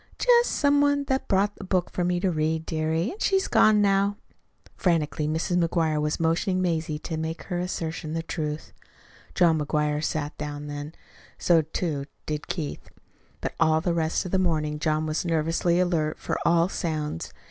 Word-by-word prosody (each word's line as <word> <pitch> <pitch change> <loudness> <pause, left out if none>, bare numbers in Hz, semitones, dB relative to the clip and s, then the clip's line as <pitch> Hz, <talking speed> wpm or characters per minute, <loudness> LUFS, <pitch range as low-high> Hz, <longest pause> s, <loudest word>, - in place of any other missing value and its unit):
"Just 485 -1 +4
some 285 0 +3
one 285 0 +3
that 265 -1 -1
brought 200 +1 +2
a - - -7
book 185 -1 0
to 180 - -1
me, 175 0 +1
dearie, 160 0 0
an' 400 - -10
she's 385 -3 +2
gone 215 -2 +5
now." 200 +1 +2 0.6
Frantically 155 -4 0
Mrs. 170 +3 +1
McGuire 160 -2 +1
was 150 0 -1
motioning 165 +3 +1
Mazie 160 -4 -1
to 160 +1 -5
make 160 +1 -4
her 175 -2 -3
assertion 165 -3 -3
the 165 0 -2
truth. 155 -2 -4 0.6
John 165 -3 +4
McGuire 150 0 0
sat 150 -1 -2
down 145 0 -5
then. 145 +2 -6 0.4
So, 170 -2 +4
too, 155 -2 -3 0.2
did 150 -1 -4
Keith. 155 -5 -5 0.5
But - - -3
all 160 -1 +4
the 170 +1 0
rest 160 +2 0
of 180 - -5
the 190 - +2
morning 155 -4 0
John 155 0 0
was 155 0 -1
nervously 165 +1 +1
alert 165 -4 +1
for - - -3
all 170 0 +4
sounds. 155 - -3
165 Hz, 170 wpm, -26 LUFS, 155-185 Hz, 0.6 s, gone